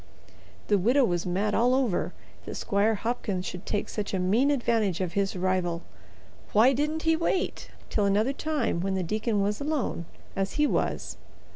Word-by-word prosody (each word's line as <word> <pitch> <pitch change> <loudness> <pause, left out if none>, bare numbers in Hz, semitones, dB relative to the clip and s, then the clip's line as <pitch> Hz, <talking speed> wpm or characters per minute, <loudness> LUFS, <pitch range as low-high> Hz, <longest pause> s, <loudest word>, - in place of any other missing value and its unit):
The 205 -2 +3
widow 250 +8 +4
was 175 -3 -1
mad 200 +4 0
all 245 +2 +3
over 250 -9 +1 0.4
that - - -5
Squire 205 +2 +1
Hopkins 205 -4 -2
should 180 +1 -6
take 205 - -1
such 205 -2 -3
a - - 0
mean 215 +10 +3
advantage 230 - +1
of 180 -3 -2
his 200 -1 0
rival. 180 -2 0 0.7
Why 230 +6 +6
didn't 300 +4 -1
he 325 0 +4
wait 340 +3 -1 0.2
till 210 - +2
another 210 +7 +2
time 290 - -1
when 190 +1 -1
the 190 - 0
deacon 215 +3 0
was 205 +4 -1
alone, 285 - -1 0.3
as 195 0 -1
he 300 - +3
was? - - -1
210 Hz, 170 wpm, -27 LUFS, 190-255 Hz, 0.7 s, Why